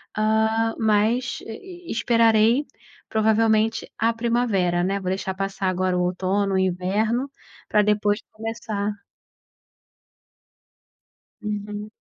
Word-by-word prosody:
ah, 220 +1 +2
mas, 220 +3 +1
eh, 225 - -6
ih, 355 - -10
esperarei 230 +3 +3 0.4
provavelmente 220 0 +2
a 230 +1 +2
primavera, 225 -7 +1
né, 200 +1 0
vou 185 - -3
deixar 190 0 -2
passar 195 0 -3
agora 185 0 0
o - - +1
outono, 190 +2 0
o - - +3
inverno, 205 +8 0 0.4
pra 210 - +3
depois 210 0 +1
começar. 215 -2 -3 2.5
Uhum. 210 0 -5
215 Hz, 105 wpm, -23 LUFS, 195-225 Hz, 2.5 s, esperarei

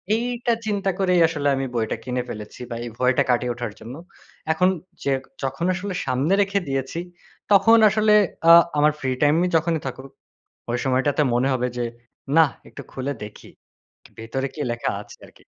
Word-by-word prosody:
এইটা 240 0 -1
চিন্তা 200 -2 -1
করেই 180 -2 +3
আসলে 150 -3 -2
আমি 135 0 -2
বইটা 110 -1 -1
কিনে 125 0 -2
ফেলেছি 105 +3 -8
বা 120 - -4
এই - - -5
ভয়টা 125 0 +3
কাটিয়ে 125 0 +1
ওঠার 120 -3 -5
জন্য। 120 +4 -9 0.6
এখন 180 +3 +3 0.3
যে 140 - 0 0.3
যখন 135 +6 -2
আসলে 185 +2 -4
সামনে 135 +8 0
রেখে 200 0 +1
দিয়েছি, 135 +4 -3 0.5
তখন 225 +3 +6
আসলে 215 0 +3 0.4
আ - - +11 0.3
আমার 150 +1 +4
ফ্রি 130 -2 -2
টাইম 150 +1 +4 0.2
যখনই 160 -1 +1
থাকুক, 130 +1 -8 0.6
ওই 120 - 0
সময়টাতে 135 +3 +1
মনে 125 +3 +2
হবে 125 0 -1
যে, 120 - 0 0.5
না 165 - +8 0.2
একটু - - -10
খুলে 135 +2 -3
দেখি 105 - -12 0.7
ভেতরে 130 +5 -3
কি 150 - -5
লেখা 120 - -2
আছে - - -15
আরকি। - - -21
140 Hz, 165 wpm, -23 LUFS, 125-180 Hz, 0.7 s, আ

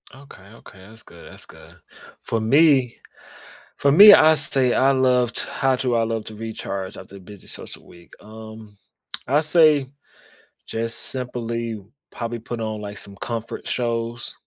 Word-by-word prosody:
Okay, 135 -7 -15 0.2
okay, 95 - -16
that's 110 +1 -16
good, 85 - -15
that's - - -13
good, - - -17 0.5
for 115 - -2
me 135 +1 +3 0.8
for 140 - +2
me, 205 +7 +10
I 160 -3 +6
say 135 -4 +1
I 135 +1 +3
loved 125 -2 +1
how 135 -1 -1
do 125 -2 -1
I 115 - +2
love 115 -1 -3
to 110 - -8
recharge 105 -3 -6
after 100 - -12
a - - -11
busy 100 +1 -14
social - - -11
week? 85 0 -18
Um, 110 -1 -13 0.5
I 140 +4 +3
say 155 -3 +3 0.8
just 115 +1 -3
simply 115 -3 -5 0.3
probably 120 0 -5
put 115 +1 -7
on, 110 -1 -4
like, 105 0 -8
some 100 -1 -11
comfort 115 0 -6
shows, 115 -1 -3
115 Hz, 155 wpm, -22 LUFS, 110-130 Hz, 0.8 s, me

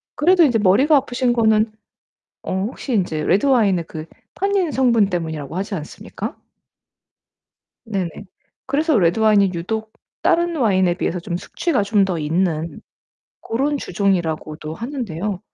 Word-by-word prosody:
그래도 350 +3 +4
인제 245 -7 +3
머리가 220 +11 +4
아프신 255 -2 0
거는 220 -2 +3 0.7
어 - - -4 0.2
혹시 260 +1 -6
인제 175 -7 0
레드와인의 205 -7 +3
그 155 0 -7 0.3
탄닌 390 -3 0
성분 235 -6 +3
때문이라고 160 -3 -4
하지 200 +2 -3
않습니까? 155 -4 -7 1.5
네네. 195 -6 -2 0.6
그래서 300 -3 +2
레드와인이 200 +2 +3
유독 220 +6 -4 0.3
다른 340 0 +2
와인에 190 -8 +2
비해서 180 -1 -2
좀 175 -1 -4
숙취가 265 - -1
좀 200 -1 +2
더 180 -3 -2
있는 165 +1 -1 0.6
고런 275 +6 -1
주종이라고도 165 - -2
하는데요. 210 - -4
205 Hz, 305 characters per minute, -20 LUFS, 175-255 Hz, 1.5 s, 그래도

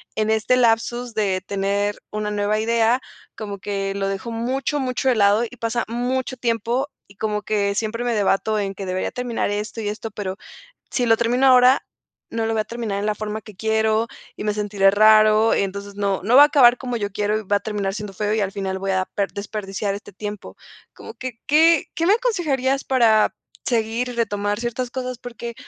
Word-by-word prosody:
en 215 0 0
este 220 +3 +2
lapsus 240 0 +1
de 195 -3 0
tener 200 +1 0 0.2
una 210 0 -2
nueva 205 +1 0
idea 230 +2 +2 0.4
como 205 -2 -5
que 195 -1 -3
lo 195 -1 -1
dejo 195 +4 -4
mucho, 260 +5 -1
mucho 260 0 0
de 245 - +3
lado 205 +2 +4
y 250 - -14
pasa 230 +1 -1
mucho 250 +2 -2
tiempo 235 +3 -1 0.2
y 200 - -19
como 210 -1 -1
que 200 -2 0
siempre 230 +3 -2
me 240 - +1
debato 210 +1 +1
en 195 -1 -3
que 195 - -6
debería 185 0 -2
terminar 245 -4 -2
esto 210 +2 -4
y 205 - -2
esto, 215 +1 -6
pero 195 -1 -5 0.5
si 245 - 0
lo 225 - +5
termino 245 +3 +2
ahora, 255 +1 +6 0.5
no 225 -1 -1
lo 225 - -1
voy 215 - +1
a - - -19
terminar 220 -3 -4
en 205 - -2
la 215 - +1
forma 215 +1 -4
que 215 - -13
quiero 220 +2 +1 0.3
y - - -6
me 210 -1 0
sentiré 205 -2 +2
raro, 215 +1 +5
entonces 200 +1 -3
no 200 -2 -1
no 235 +4 +2
va 285 - +10
a - - +6
acabar 250 -5 +5
como 245 -2 -3
yo 205 -3 -3
quiero 210 +1 0
y - - -6
va 205 +1 +1
a - - -1
terminar 205 -2 -2
siendo 210 -1 -6
feo 210 +2 -1
y 220 - 0
al 195 -1 -1
final 190 -2 -3
voy 195 0 -3
a 185 0 0
per 200 -1 -1
desperdiciar 200 -1 -4
este 200 0 -9
tiempo, 205 +1 -7 0.4
¿como 450 - -11
qué 255 -3 -6
qué 320 +1 +5
qué 330 - 0
me 400 - +6
aconsejarías 295 - 0
para 230 -5 +3 0.3
seguir 230 0 0
y 245 - -5
retomar 205 -3 -1
ciertas 240 +1 -3
cosas? 255 -1 -4
Porque, 235 -1 -7
220 Hz, 210 wpm, -22 LUFS, 205-240 Hz, 0.5 s, va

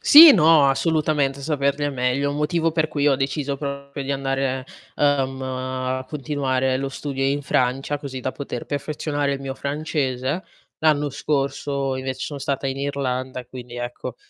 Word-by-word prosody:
Sì, 310 0 +11
no, 160 - +6
assolutamente 145 -2 +1
saperle 140 -1 0
è 145 - -1
meglio. 125 +2 0
Un 145 - -3
motivo 165 +2 +1
per 160 -1 +1
cui 145 -1 0
ho 140 - +5
deciso 140 +1 -1
proprio 140 0 -5
di 135 - -4
andare, 135 -1 -1 0.3
ehm, 135 -2 +1
a 130 0 -3
continuare 130 -3 0
lo 135 +1 -2
studio 135 0 -4
in 140 +2 +1
Francia, 135 +2 0
così 135 -3 -6
da 130 +1 -3
poter 135 -4 -5
perfezionare 145 0 -2
il 135 - -6
mio 135 -1 -4
francese. 140 +1 -2 0.4
L'anno 150 -2 +3
scorso 140 -1 -1
invece 130 0 -4
son 140 +2 -5
stata 140 0 -2
in 135 0 -2
Irlanda, 130 -2 -2
quindi 125 -1 -9
ecco, 120 0 -5
140 Hz, 160 wpm, -23 LUFS, 130-145 Hz, 0.4 s, Sì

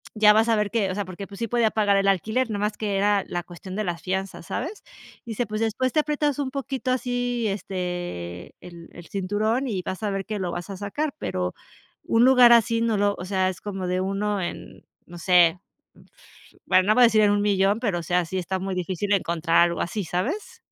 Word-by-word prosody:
ya 210 -1 +6
vas 220 +2 +3
a 225 - +4
ver 210 -1 0
qué", 215 -5 +1
o 185 - -3
sea, 205 - -1
porque 185 +2 -8
pues 200 -1 -11
sí 230 - -2
podía 235 -2 +2
pagar 205 -2 +2
el 195 0 +1
alquiler, 220 +6 +1
nomás 210 0 -2
que 205 -2 -2
era 205 0 +2
la 175 -1 -3
cuestión 185 +2 -10
de 215 - -1
las 175 -3 -3
fianzas, 190 -1 -4
¿sabes?, 385 - -5 0.4
dice, 235 +1 -2
"Pues 215 +1 -4
después 250 +4 0
te 310 - +3
aprietas 295 -1 -1
un 270 -2 -2
poquito 270 -1 -3
así, 245 -2 -1
este, 175 - -5
el 170 -1 -11
el 175 -1 -12
cinturón 215 +7 -1
y 195 -6 -2
vas 185 - -5
a 205 - 0
ver 195 -1 -3
que 215 -1 -4
lo 180 -2 -2
vas 175 +1 -6
a 195 - -6
sacar", 265 +10 -3
pero 90 0 -2 0.5
un 230 +1 +3
lugar 250 -2 +7
así 230 0 +3
no 230 -1 +1
lo 205 0 +2
o 180 - -5
sea, 185 -1 +1
es 185 - -6
como 195 -3 -4
de 180 +1 0
1 200 +2 -1
en, 175 - -7 0.2
no 175 0 -10
sé, 175 0 +4 0.8
f - - -23
bueno, 185 - +4
no 215 - +5
voy 250 - +5
a - - +9
decir 220 -1 +3
en 205 - +5
un 205 0 +1
millón, 200 +1 +2
pero 200 -8 0
o - - -7
sea, 175 +2 +1
sí 190 +3 -4
está 185 +1 -2
muy 190 0 -3
difícil 185 +2 -2
encontrar 170 -3 0
algo 170 0 -2
así, 185 +3 -3
¿sabes? 230 - -3
200 Hz, 230 wpm, -24 LUFS, 185-225 Hz, 0.8 s, a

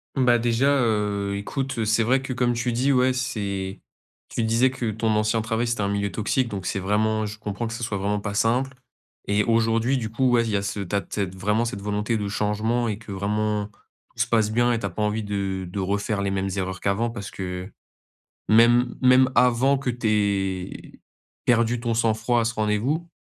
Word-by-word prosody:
Bah, 125 -3 +4
déjà, 120 +4 +2
heu, 105 -3 0
écoute, 135 +6 -4
heu, 110 - 0
c'est 110 +2 +2
vrai 130 +4 +2
que 130 - -4
comme 120 -1 +1
tu 120 +1 -1
dis 130 +4 +2
ouais 130 -1 +3
c'est 100 -7 -3 0.5
tu 115 - -2
disais 115 +4 +3
que 125 -3 -3
ton 110 +1 -1
ancien 110 +1 +1
travail, 115 +2 -1
c'était 115 -3 -1
un 100 - +1
milieu 100 -1 -1
toxique 110 +6 0
donc, 95 -3 -5
c'est 100 - -1
vraiment 110 +3 +1
je 110 +1 -7
comprends 105 +2 -4
que 115 - -5
ce 120 - -5
soit 110 -3 -2
vraiment 105 +1 0
pas 100 0 -4
simple. 125 +5 +1 0.5
Et 105 +1 +2
aujourd'hui, 115 +2 +2
du 110 - -4
coup 130 +1 +2
ouais, 120 -1 +4
il 115 - -3
y 105 - 0
a 100 - -2
ce 100 +1 -3
tu 100 +1 -3
as 100 - +2
de - - -18
cette 95 -3 -2
vraiment 105 +4 +1
cette 100 -4 -4
volonté 105 +2 -1
de 105 - -3
changement 110 +4 0
et 105 - -2
que 110 -2 -11
vraiment 105 +1 -1
tout 105 - -32
se - - -7
passe 110 -3 +2
bien 120 +2 +2
et 115 - 0
tu 100 - -4
as - - -1
pas 100 +5 -3
envie 105 +1 -1
de 95 -2 -3
de 100 +2 -5
refaire 100 +2 -1
les 100 - -1
mêmes 95 0 -1
erreurs 95 -1 -3
qu'avant 110 +4 0
parce 100 -4 -7
que, 90 -1 -5
heu, - - -19 0.8
même 120 +2 +5
même 130 0 +6
avant 125 +2 +4
que 135 -2 -2
tu 120 -1 -4
aies 95 -3 -1 0.4
perdu 115 0 +2
ton 120 -1 -1
sang-froid 115 +1 +1
à - - 0
ce 115 0 -1
rendez-vous 115 +11 0
110 Hz, 220 wpm, -24 LUFS, 100-120 Hz, 0.8 s, même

